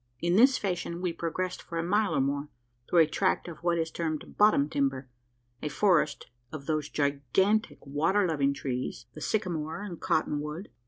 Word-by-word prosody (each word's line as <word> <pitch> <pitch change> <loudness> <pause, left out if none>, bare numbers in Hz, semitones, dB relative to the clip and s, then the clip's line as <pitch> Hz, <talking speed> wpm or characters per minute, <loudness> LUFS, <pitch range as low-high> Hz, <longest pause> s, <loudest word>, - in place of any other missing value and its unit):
In 175 +1 +1
this 255 +5 +6
fashion 175 -3 -3
we 180 -2 -1
progressed 175 +2 -3
for 170 - -6
a 165 - 0
mile 205 +4 +1
or - - +3
more, 140 +2 -1 0.4
through 175 - +6
a - - +6
tract 180 +4 0
of 165 -3 -8
what 170 0 +1
is 160 -1 -1
termed 160 -2 -4
"bottom 205 -9 +5
timber" 135 -3 -1 0.5
a 150 - -2
forest 155 -3 +2 0.3
of 150 -3 -7
those 155 -1 -1
gigantic 145 - +1
water 160 +9 +2
loving 140 -4 +1
trees 125 -3 -4
the 155 - -10
sycamore 170 -3 -2
and 180 -5 -7
cotton 150 -2 +1
wood. 150 +6 -6
165 Hz, 175 wpm, -29 LUFS, 145-185 Hz, 0.5 s, this